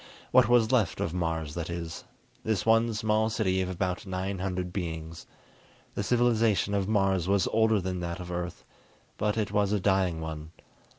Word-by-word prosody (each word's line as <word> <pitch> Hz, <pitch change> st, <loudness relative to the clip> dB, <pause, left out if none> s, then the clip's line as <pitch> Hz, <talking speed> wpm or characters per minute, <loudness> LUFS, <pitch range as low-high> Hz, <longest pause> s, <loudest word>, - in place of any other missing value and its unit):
What 110 Hz, -, +5 dB
was 120 Hz, -1 st, +4 dB
left 115 Hz, -10 st, +2 dB
of 85 Hz, -, -2 dB
Mars, 80 Hz, -4 st, -2 dB
that 85 Hz, 0 st, -4 dB
is; 85 Hz, -1 st, -5 dB, 0.4 s
this 110 Hz, -3 st, -1 dB
one 115 Hz, +1 st, +4 dB
small 110 Hz, +1 st, +1 dB
city 95 Hz, -4 st, 0 dB
of 95 Hz, -, -2 dB
about 90 Hz, +1 st, -3 dB
nine 95 Hz, +1 st, -3 dB
hundred 90 Hz, -1 st, -3 dB
beings. 80 Hz, -3 st, -5 dB, 0.7 s
The -, -, -2 dB
civilization 115 Hz, -3 st, +2 dB
of 100 Hz, -1 st, 0 dB
Mars 95 Hz, -4 st, +1 dB
was 100 Hz, -1 st, +2 dB
older 110 Hz, -1 st, +3 dB
than 90 Hz, -1 st, -3 dB
that 85 Hz, 0 st, -4 dB
of 90 Hz, -1 st, -7 dB
Earth, 90 Hz, 0 st, -5 dB, 0.5 s
but 105 Hz, +1 st, 0 dB
it 105 Hz, -2 st, -1 dB
was 105 Hz, -1 st, +1 dB
a 105 Hz, -, +2 dB
dying 95 Hz, -3 st, +1 dB
one. 80 Hz, 0 st, -6 dB
95 Hz, 175 wpm, -28 LUFS, 85-105 Hz, 0.7 s, What